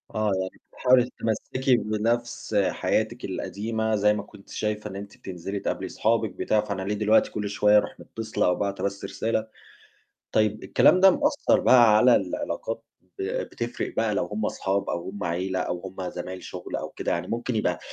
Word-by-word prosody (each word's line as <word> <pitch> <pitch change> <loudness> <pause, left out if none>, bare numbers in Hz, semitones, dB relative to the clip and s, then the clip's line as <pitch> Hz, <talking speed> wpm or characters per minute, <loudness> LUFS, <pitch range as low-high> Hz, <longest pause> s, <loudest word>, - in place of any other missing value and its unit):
آه 110 -1 +1
يعني 95 - -6
بتحاولي 125 -1 +4
تتمسّكي 125 +4 0
بنفْس 115 +1 -1
حياتِك - - -1
القديمة 110 +1 -2
زي 105 +1 +4
ما 105 - -3
كنتِ 100 -2 -16
شايفة 105 0 -3
إن 95 - -8
أنتِ 100 +1 -8
بتنزلي 95 +2 -5
تقابلي - - -3
صحابِك 110 -1 +1
بتاع، 105 +3 +1
فأنا 100 -2 -4
ليه 105 +2 -1
دلوقتي 105 +1 +3
كلّ 105 -1 -3
شوية 105 +1 +4
أروح 105 - -1
متصلة 115 -1 -3
أو 90 - +3
باعتة 100 -1 -2
بس 100 0 -2
رسالة، 110 -1 -1 0.8
طيب 110 0 +1
الكلام 185 - +5
ده 190 0 +8
مأثّر 290 - +2
بقى 120 -4 +6
على 125 +2 +6
العلاقات 100 +4 -3 0.4
ب - - -1 0.2
بتفرِق 120 0 -4
بقى 110 -1 +1
لو - - +1
هُم 105 0 -3
أصحاب 95 +1 -1
أو 85 +2 -3
هُم 100 +1 -6
عيلة 95 +2 -1
أو 90 -1 -2
هُم 95 0 -6
زمايل 90 +1 -6
شغل 90 -1 -6
أو - - -4
كده، - - -3
يعني - - -1
ممكن 120 +1 -2
يبقى 105 - 0
105 Hz, 175 wpm, -26 LUFS, 100-115 Hz, 0.8 s, ده